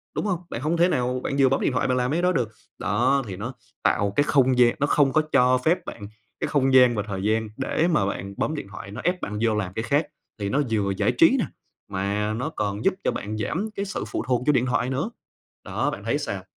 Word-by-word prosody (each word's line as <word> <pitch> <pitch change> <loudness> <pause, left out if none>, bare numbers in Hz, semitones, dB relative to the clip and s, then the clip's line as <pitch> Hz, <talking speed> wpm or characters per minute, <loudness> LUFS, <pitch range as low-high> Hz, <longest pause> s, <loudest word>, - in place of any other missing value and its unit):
đúng - - -1
hông? 185 -5 0
Bạn 115 - -5
hông 160 +4 0
thể 175 +2 +4
nào 125 -4 0
bạn 140 - -2
vừa 135 -1 +6
bấm 135 - +1
điện - - +1
thoại 130 - 0
bạn 125 0 +1
làm 125 +2 0
mấy 170 +3 +1
đó 180 - +3
được. 125 - 0 0.3
Đó, 130 +6 +2
thì 95 - -5
nó 115 +7 -5 0.3
tạo 100 -1 +2
cái 145 - +4
không 130 -3 +3
gian 120 -1 +5
nó 145 - +2
không 140 -2 +3
có 155 - +4
cho 130 -1 +5
phép 160 +8 +1
bạn 100 -3 -7 0.3
cái - - -1
không 135 -2 +2
gian 125 -2 +6
và 105 - -1
thời 95 -2 -4
gian 110 +1 +1
để 155 +5 0
mà 150 - +2
bạn 100 0 -4
bấm 155 - -1
điện 145 - -6
thoại, 100 - -8
nó 105 - -6
ép 180 0 0
bạn 105 +1 -4
vô 115 -2 +2
làm 95 -3 -2
cái 110 - -3
khác 145 +5 +1 0.3
thì 100 -1 -2
nó 145 +6 +2
vừa 105 -3 +1
giải - - +2
trí - - +5
nè, - - +1 0.4
mà 100 +3 -1
nó 125 +8 -2
còn 105 -5 -3
giúp 195 - +4
cho - - +2
bạn 105 +1 -4
giảm 185 - -2
cái 200 - -2
sự 195 - -4
phụ - - -3
thuộc 125 -2 +1
vô 150 - +5
điện 125 -2 +2
thoại 125 0 0
nữa. 140 - -1 0.5
Đó, - - -1
bạn - - -7
thấy - - 0
sao? - - -4
125 Hz, 265 wpm, -24 LUFS, 105-145 Hz, 0.5 s, vừa